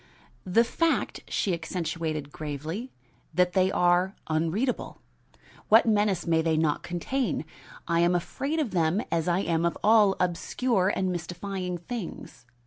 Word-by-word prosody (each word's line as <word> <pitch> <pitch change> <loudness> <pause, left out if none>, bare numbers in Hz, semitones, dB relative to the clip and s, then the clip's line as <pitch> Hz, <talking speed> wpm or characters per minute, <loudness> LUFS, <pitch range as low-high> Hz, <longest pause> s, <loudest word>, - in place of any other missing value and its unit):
"The 225 +6 +4
fact," 330 +7 0
she 195 - 0
accentuated 165 -3 -3
gravely, 155 - -5 0.4
"that 180 0 +3
they 190 0 +3
are 180 +2 +2
unreadable. 165 +11 -1 0.7
What 220 +2 +7
menace 205 -5 +2
may 165 -1 +2
they 160 -1 +1
not 155 -2 +1
contain? 175 - -2 0.4
I 170 0 +2
am 175 +1 +3
afraid 275 - -2
of 275 -9 -1
them, 170 +3 +1
as 165 -1 0
I 175 +2 +2
am 165 -3 0
of 170 - 0
all 210 -2 +5
obscure 185 +3 +1
and 185 -1 0
mystifying 180 +1 -4
things." 175 - -7
180 Hz, 135 wpm, -27 LUFS, 165-205 Hz, 0.7 s, What